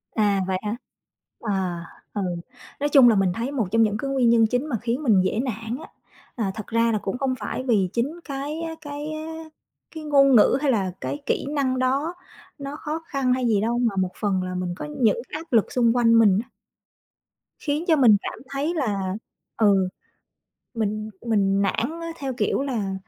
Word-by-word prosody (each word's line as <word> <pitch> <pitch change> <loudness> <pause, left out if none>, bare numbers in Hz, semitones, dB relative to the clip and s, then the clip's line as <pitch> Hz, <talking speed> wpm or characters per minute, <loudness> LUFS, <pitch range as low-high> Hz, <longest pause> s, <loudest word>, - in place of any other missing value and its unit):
À, 205 -3 +2
vậy 185 -1 0
hả? 210 +2 -2 0.6
À, 185 -5 -2 0.3
ừ, 205 - -2 0.6
nói 290 +1 0
chung 270 -4 +7
là 225 - +4
mình 190 -2 +2
thấy 235 +7 -3
một 245 -9 -1
trong 225 0 +4
những 210 -1 +1
cái 275 - -3
nguyên 255 -3 +3
nhân 230 -1 +5
chính 250 +4 0
mà 235 - 0
khiến 240 +5 -2
mình 210 -8 +4
dễ 200 +4 0
nản, 230 -1 -3
á, - - -10 0.5
à, 210 -6 -1
thật 215 - -7
ra 230 0 +2
là 215 - +1
cũng 200 +5 -3
không 265 -1 0
phải 215 +4 -4
vì 210 -8 +2
chính 285 +9 -1
cái 285 +3 -4
á 325 -1 -4
cái 290 +1 -6
á, 320 +1 -6 0.5
cái 315 - -6
ngôn 275 -3 +5
ngữ 220 - +6
hay 290 -3 +2
là 195 -6 0
cái 285 - -3
kỹ - - 0
năng 270 -3 0
đó 275 +6 0 0.4
nó 280 0 -6
khó 310 +1 -4
khăn 265 -3 +1
hay 255 -1 0
gì 210 -3 +2
đâu, 235 +2 0
mà 230 -5 +1
một 185 -1 0
phần 195 -3 0
là 185 0 -4
mình 180 -1 -2
có - - -6 0.2
những 225 0 +3
áp 315 -1 -7
lực 225 -3 +3
xung 235 -2 +3
quanh 230 -1 +5
mình, 205 -4 +5
á - - -27 1.1
khiến 300 +2 -2
cho 325 - +5
mình 240 -8 +6
cảm - - -6
thấy 280 +4 -1
là, 200 - -1 0.4
ừ, 195 -4 +3 0.9
mình 215 -1 -2 0.2
mình 200 -3 +2
nản, 195 - +1 0.2
á, 335 - -5
theo 270 -3 -3
kiểu 265 - 0
là, 220 -8 -2
235 Hz, 205 wpm, -24 LUFS, 205-275 Hz, 1.1 s, chung